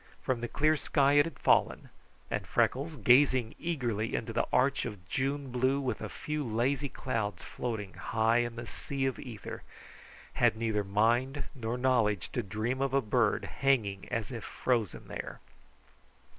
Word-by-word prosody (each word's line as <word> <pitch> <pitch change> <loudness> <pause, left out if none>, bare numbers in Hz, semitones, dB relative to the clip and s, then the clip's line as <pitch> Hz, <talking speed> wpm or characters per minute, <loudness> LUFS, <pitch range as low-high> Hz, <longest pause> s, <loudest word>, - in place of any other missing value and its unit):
From 125 -3 0
the 120 - -2
clear 155 +5 +2
sky 140 -1 +2
it 145 +2 +5
had 165 - -9
fallen, - - +2 0.4
and - - -2
Freckles, 145 +5 +1
gazing 130 -3 +4
eagerly 120 -10 -1
into 115 0 -3
the 115 - +1
arch 140 +2 +3
of 100 -6 -7
June 135 +4 -2
blue 130 +3 +2
with 130 -2 -2
a - - -4
few 150 0 -3
lazy 130 +4 0
clouds 110 -7 -3
floating 110 -5 -4
high 115 +1 +1
in 120 -1 -1
the 120 0 -6
sea 135 +3 -4
of 130 - -1
ether, 115 -5 -7 0.7
had - - +3
neither 110 -2 0
mind 120 +8 +1
nor 120 -2 -3
knowledge 115 -7 +1
to 125 - -1
dream 110 +5 -2
of 135 -1 +1
a - - +5
bird 115 -1 +1
hanging 110 -8 +1
as 115 0 -2
if 115 -4 -5
frozen 115 -7 -1
there. - - -6
125 Hz, 160 wpm, -31 LUFS, 110-135 Hz, 0.7 s, it